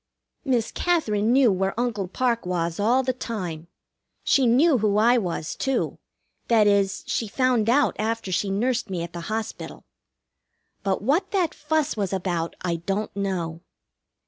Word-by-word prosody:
Miss 245 -6 0
Katherine 230 -12 +1
knew 255 -3 +5
where 190 +3 -1
Uncle 220 -6 -1
Parke 235 +4 0
was 170 -1 -2
all 240 +6 +3
the 255 0 0
time. 180 -10 -5 0.6
She 265 -3 +3
knew 265 +4 +4
who 210 -1 +1
I 240 +3 +5
was, 170 -5 -3
too; 270 0 -1 0.5
that 225 -3 +4
is, 200 -1 +2
she 225 - -1
found 245 0 +1
out 280 +4 +3
after 220 -2 -2
she 195 +3 0
nursed 225 +4 0
me 180 -3 -3
at 170 -1 -8
the 170 - -5
hospital. 220 0 -5 1.0
But 195 -1 -1
what 335 - +1
that 370 -6 0
fuss 305 -1 -1
was 200 -3 -2
about 175 -3 -2
I 170 -2 -1
don't 195 +6 -3
know. 175 -5 -3
215 Hz, 155 wpm, -24 LUFS, 190-250 Hz, 1.0 s, knew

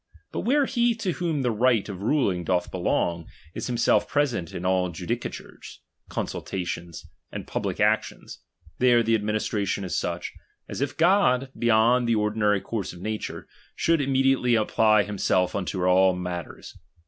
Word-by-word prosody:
But - - -4
where 280 +4 +2
he 240 -3 +1
to 220 -5 -2
whom 165 -5 -2
the 125 - +1
right 115 -1 +2
of 100 -3 -7
ruling 100 -7 +1
doth 90 +1 -1
belong, 85 -2 -1 0.3
is - - -5
himself 120 -2 +2
present 125 - -1
in 90 - -6
all 95 -1 +1
judicatures, 90 +8 -6 0.3
consultations, 85 -3 -5 0.3
and - - -6
public - - -3
actions, - - 0 0.4
there 120 -2 +4
the 115 0 +1
administration 105 -2 -1
is 90 - -3
such, 85 0 -3 0.3
as - - -6
if 140 -1 -2
God, 160 -8 +3
beyond 120 +1 +3
the 115 - +3
ordinary 105 -1 +1
course 110 -6 -4
of 90 - -12
nature, 110 +3 -5 0.3
should 165 -2 +2
im 135 0 -1
mediately 135 -2 +3
apply 110 -1 +3
himself 95 -3 0
unto 95 -1 -2
all 95 0 +4
matters. 90 -1 -6
110 Hz, 150 wpm, -25 LUFS, 95-130 Hz, 0.4 s, there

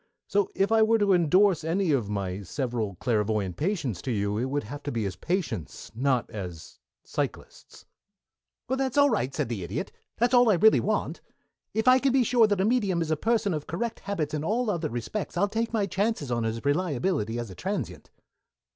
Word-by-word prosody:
So 200 -1 +1
if 195 +2 +1
I 225 0 +5
were 225 +1 +4
to 205 -2 +3
indorse 180 +1 +4
any 175 +3 0
one 145 - +4
of 105 -4 -7
my 100 -2 -3
several 115 -1 -3
clairvoyant 105 -4 0
patients 145 - -2
for - - -5
you, 105 -3 0
it 125 - 0
would 140 +2 -2
have 145 +7 -8
to 145 - -4
be 115 -4 -2
as 95 -2 -3
patients, 175 - -3
and 115 - -8
not 130 -3 +2
as 90 -6 -8 0.2
psychlists." - - -6 0.8
"That's 265 +1 -1
all 285 -1 +6
right," 170 - 0
said - - -2
the 115 -4 -4
Idiot. 85 - -4 0.3
"That's 240 +2 +2
all 245 -2 +6
I 210 - +5
really 215 +6 +5
want. - - -1 0.5
If 220 +2 0
I 255 +1 +7
can 270 -1 +1
be 265 -1 +4
sure 235 -1 +4
that 205 -2 0
a - - +2
medium 205 -6 +1
is 160 -1 -1
a - - +3
person 220 +2 +1
of 150 -2 -4
correct 220 +9 -3
habits 180 -8 -3
in 150 -1 -2
all 225 +5 0
other 170 -5 -2
respects, 130 - -4
I'll 200 +3 +3
take 225 +2 -2
my 220 -3 +1
chances 195 - -1
on 120 -1 0
his 115 +2 -3
reliability 145 - 0
as 120 -4 -5
a - - -10
transient." - - -4
165 Hz, 210 wpm, -27 LUFS, -, 0.8 s, I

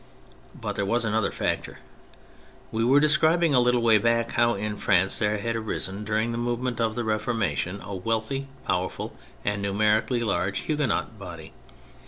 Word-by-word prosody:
But - - -4
there 100 - +1
was 115 +3 +1
another 110 -1 +1
factor. - - -2 0.9
We 110 +1 0
were 135 +4 +5
describing 155 +2 +4
a 125 - +6
little 125 -1 +3
way 110 -2 +5
back 115 +1 +1
how 120 -1 +2
in 105 +1 -3
France 95 -1 +2
there 105 -1 +1
had 115 +3 -2
arisen, 105 -2 -3
during 110 +2 0
the 115 - -3
movement 120 0 -2
of 110 -1 0
the 120 - -1
Reformation, 110 -5 -1
a 100 - -7
wealthy, 115 +7 -2 0.2
powerful 90 +1 -2 0.3
and 100 0 -1
numeri 105 +2 +3
cally 120 -2 0
large 95 -3 0
Huguenot 140 -7 -1
body. 85 -5 -9
110 Hz, 165 wpm, -26 LUFS, 100-120 Hz, 0.9 s, a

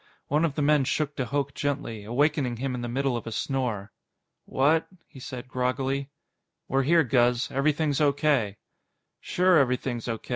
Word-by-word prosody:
One 150 +4 +2
of 145 -4 -2
the 150 - 0
men 150 -1 +4
shook 145 +2 -1
de 130 - -2
Hooch 140 0 -1
gently, 130 -7 -3
awakening 130 +1 +1
him 135 +2 -2
in 125 - -4
the 120 - -3
middle 130 +1 0
of 115 - -5
a - - -4
snore. 115 -5 -2 0.5
"What?" 150 +5 +2 0.2
he 135 - -14
said 125 -1 -7
groggily. 130 +2 -1 0.6
"We're 135 +1 +2
here, 165 +4 +4
Guz. 125 -2 +2
Everything's 145 +1 +1
O.K." 140 -8 +2 0.6
"Sure 180 -1 +3
everything's 125 -2 -1
O. 115 -1 -1
135 Hz, 160 wpm, -26 LUFS, 125-145 Hz, 0.6 s, men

